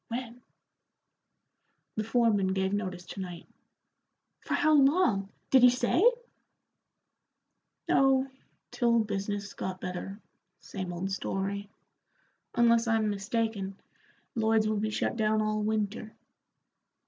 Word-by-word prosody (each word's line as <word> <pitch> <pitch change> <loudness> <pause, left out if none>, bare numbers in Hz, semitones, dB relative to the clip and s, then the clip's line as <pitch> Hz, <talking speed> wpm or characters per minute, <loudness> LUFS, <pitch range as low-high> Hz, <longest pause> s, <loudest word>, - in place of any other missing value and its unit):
"When?" 240 0 -6 1.5
"The 215 - -1
foreman 215 -4 +2
gave 190 0 0
notice 185 -4 -3
to 185 - -9
night." 175 -3 -7 0.9
"For - - -2
how 310 -3 +3
long? 275 - +3 0.2
Did 265 - +6
he 250 - +9
say?" 255 +8 +1 1.8
"Oh, 270 0 +3 0.4
till 235 -2 +2
business 200 -1 -3
got 185 0 -5
better 185 +2 -6 0.4
same 185 -3 -6
old 180 +3 -4
story. 195 +1 -3 0.9
Unless 235 0 +4
I'm 220 -2 +2
mistaken, 205 -1 -2 0.5
Lloyd's 220 -1 +2
will 215 0 0
be 215 +1 -1
shut 215 - -2
down 215 -1 +2
all 215 0 0
winter." 215 0 -2
215 Hz, 110 wpm, -29 LUFS, 195-235 Hz, 1.8 s, he